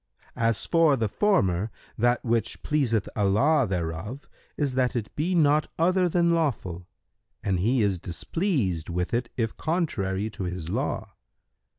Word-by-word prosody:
As 115 -2 +1
for 165 -4 +4
the 115 -2 0
former, 100 - +1 0.3
that 120 +2 +1
which 115 -2 -1
pleaseth 125 -8 +1
Allah 120 +8 +3
thereof 90 - -4 0.3
is 145 -3 0
that 130 -1 +1
it 110 -3 -4
be 175 +5 0
not 150 -2 +4
other 180 +2 +3
than 170 0 +3
lawful[FN#134] 115 - -1 0.6
and 95 -3 0
He 115 +5 +2
is 95 -3 +1
displeased 95 - -1
with 90 +3 -2
it 120 0 0
if 115 -2 -1
contrary 110 - -1
to 95 - -5
His 90 -2 -4
law. - - -2
115 Hz, 145 wpm, -26 LUFS, 95-150 Hz, 0.6 s, for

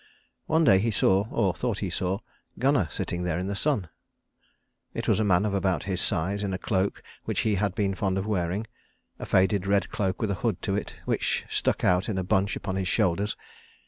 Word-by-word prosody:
One 160 +1 +3
day 95 -11 +6
he 115 +4 +1
saw, 100 -1 +3
or 100 -6 +1
thought 120 +1 -2
he 95 -4 -3
saw, 95 +4 -1 0.4
Gunnar 130 - +2
sitting 85 +4 -3
there 90 -2 -1
in 90 - -2
the 100 +1 -2
sun. 105 - 0 1.1
It - - -3
was - - +3
a - - +3
man 95 -1 +3
of 105 - -1
about 95 -5 +1
his 95 -2 -2
size 100 +2 0
in 95 -2 -1
a - - -2
cloak 95 0 -1 0.2
which - - 0
he 110 - +1
had 100 -1 0
been 100 -3 +1
fond 95 -1 -1
of 95 - -1
wearing; 95 0 -1 0.5
a - - -6
faded 95 0 +2
red 100 0 +2
cloak 95 -2 -1
with 110 -3 0
a 95 - -4
hood 110 -7 0
to 100 - 0
it 100 - -4
which - - 0
stuck - - 0
out 90 +4 +3
in 100 - -1
a 95 - 0
bunch 100 +3 +1
upon 95 -2 -3
his 95 -1 -1
shoulders. 100 +1 +1
100 Hz, 215 wpm, -27 LUFS, 95-105 Hz, 1.1 s, day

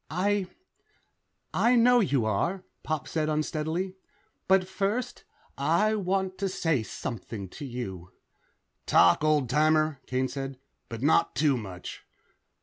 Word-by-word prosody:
"I... 190 +4 0 1.1
I 245 +2 +3
know 245 +1 +6
you 140 - +1
are," 170 - -1 0.2
Pop 155 -4 -3
said 155 -1 -1
unsteadily. 160 +4 -2 0.5
"But 190 -1 +4
first, 205 +6 -2 0.3
I 170 +10 +2
want 190 -2 -1
to 195 -1 0
say 165 -8 0
something 110 -2 -6
to 145 - -8
you." 95 -8 -6 0.8
"Talk, 90 - +5
old 150 -4 +3
timer," 155 +1 +2
Kane 130 +1 0
said. 135 -1 -5 0.3
"But 115 +1 -6
not 155 -3 +3
too 145 +1 +3
much." 95 -6 -7
155 Hz, 125 wpm, -28 LUFS, 130-190 Hz, 1.1 s, know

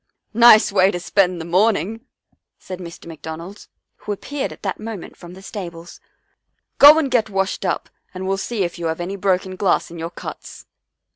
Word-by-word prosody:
" - - -50 0.2
Nice 215 -2 +6
way 190 -1 +4
to 175 - -3
spend 180 -1 +1
the 160 - -6
morning," 210 - +1 0.5
said 185 -1 -8
Mr. 170 -2 -10
McDonald, 165 +4 -9 0.3
who - - -6
appeared 275 +7 -4
at - - -13
that 195 -3 -3
moment 215 -4 -7
from 175 0 -12
the 190 - -13
stables. 175 -5 -8 0.4
" - - -53
Go 295 +2 +10
and 290 -5 0
get 225 -3 +2
washed 195 -1 -2
up - - -1 0.2
and 190 0 -6
we'll 195 0 0
see 210 +1 -2
if 175 0 -4
you 170 - -2
have 160 +1 -3
any 180 +3 -4
broken 190 -1 0
glass 190 -3 0
in 170 - -9
your 165 +1 -4
cuts." - - -9
190 Hz, 195 wpm, -20 LUFS, 175-205 Hz, 0.5 s, Go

